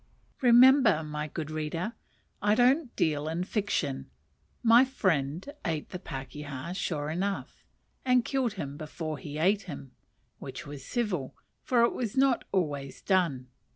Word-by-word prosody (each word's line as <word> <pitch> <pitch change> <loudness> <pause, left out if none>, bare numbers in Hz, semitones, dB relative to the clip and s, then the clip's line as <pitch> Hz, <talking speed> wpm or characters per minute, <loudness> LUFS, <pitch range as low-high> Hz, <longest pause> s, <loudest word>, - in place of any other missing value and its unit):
Remember, 250 - +6
my 150 0 -4
good 155 0 -5
reader, 160 +7 -3 0.5
I 210 +1 +3
don't 255 +3 +3
deal 150 -1 +1
in 165 +3 -1
fiction; 185 - -2 0.5
my 235 +2 +7
friend 175 - 0 0.2
ate 160 -5 -2
the 180 - -6
pakeha 145 0 -6
sure 155 -5 -2
enough, 195 +4 -3 0.4
and 250 -2 +3
killed 260 -5 0
him 145 -8 -5
before 155 -1 -5
he 145 +2 -7
ate 195 +5 +2
him: 135 -4 -8 0.5
which - - -7
was 145 -2 -8
civil, 190 - -2 0.3
for 250 -5 +3
it 235 - +3
was 235 -1 -3
not 265 -2 +3
always 145 -7 -2
done. 165 -10 +1
175 Hz, 140 wpm, -29 LUFS, 150-230 Hz, 0.5 s, my